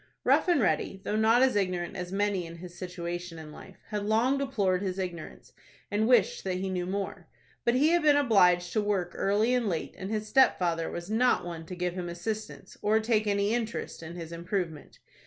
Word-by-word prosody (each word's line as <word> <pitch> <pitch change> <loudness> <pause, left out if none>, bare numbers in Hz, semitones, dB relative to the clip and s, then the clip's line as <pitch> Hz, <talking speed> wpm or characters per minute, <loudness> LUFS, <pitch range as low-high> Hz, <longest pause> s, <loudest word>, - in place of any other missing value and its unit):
Rough - - +3
and 350 -5 +4
Ready, 195 -2 0
though 210 - -2
not 225 +3 +4
as 260 -3 +3
ignorant 180 -3 -1
as 180 -1 -5
many 195 -3 0
in 165 - -9
his 175 +1 -10
situation 175 -2 -5
in 155 -1 -9
life, 190 +4 -13
had 210 -1 -2
long 230 +6 +2
deplored 200 -9 0
his 190 -2 -3
ignorance, 175 -4 -6 0.4
and 215 +2 +1
wished 240 -5 +3
that 185 -1 -2
he 190 +1 -3
knew 180 -1 -2
more. 195 +1 -4 0.4
But 235 - +3
he 290 +5 +4
had 345 +1 +3
been 295 -1 +5
obliged 180 -10 +4
to 215 - +2
work 195 -4 -1
early 210 +5 +1
and 245 -4 +1
late, 165 -3 -3
and 190 - -6
his 215 0 -2
stepfather 175 -10 +3
was 175 +4 -6
not 245 -3 +2
one 165 -2 -7
to 180 - -6
give 180 0 -2
him 180 -1 -4
assistance, 215 +6 -6
or 215 +1 +3
take 220 -1 +1
any 200 +1 +1
interest 230 -6 -3
in 165 +1 -8
his 165 -2 -7
improvement. 170 -3 -4
195 Hz, 205 wpm, -28 LUFS, 175-220 Hz, 0.4 s, been